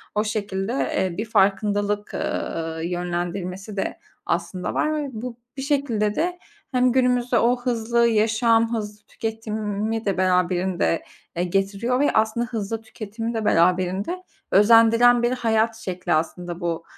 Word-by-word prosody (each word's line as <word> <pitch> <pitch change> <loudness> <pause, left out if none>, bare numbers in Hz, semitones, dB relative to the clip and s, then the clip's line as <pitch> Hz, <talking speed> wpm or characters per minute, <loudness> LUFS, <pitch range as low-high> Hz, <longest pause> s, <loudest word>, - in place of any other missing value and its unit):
o 210 - +2
şekilde, 205 0 -2
eee, 190 -9 -1
bir 215 - -2
farkındalık, 205 0 +1
ııı, 160 0 -3
yönlendirmesi 180 +3 -3
de 195 - -2 0.3
aslında 185 -1 -2
var 310 - +1
ve 295 -2 -2
bu 235 +1 -6 0.2
bir 270 - -3
şekilde 250 -8 0
de 355 +1 -1 0.3
hem 250 -1 +3
günümüzde 250 -1 +2
o 245 +2 +3
hızlı 235 -1 +1
yaşam, 225 +1 +3
hızlı 210 -1 -6
tüketimi 220 0 -3
de 195 -2 0
beraberinde, 180 -2 +1 0.3
eee, 175 - 0
getiriyor 195 +7 0
ve 290 - +3
aslında 220 +2 +1
hızlı 225 -2 -4
tüketimi 225 +1 -6
de 220 -2 -2
beraberinde 185 - +1 0.3
özendiren 230 +3 +6
bir 240 - +2
hayat 225 -2 +1
şekli 180 -4 -3
aslında 170 +2 -2
bu, 170 -2 -2
215 Hz, 135 wpm, -23 LUFS, 190-235 Hz, 0.3 s, özendiren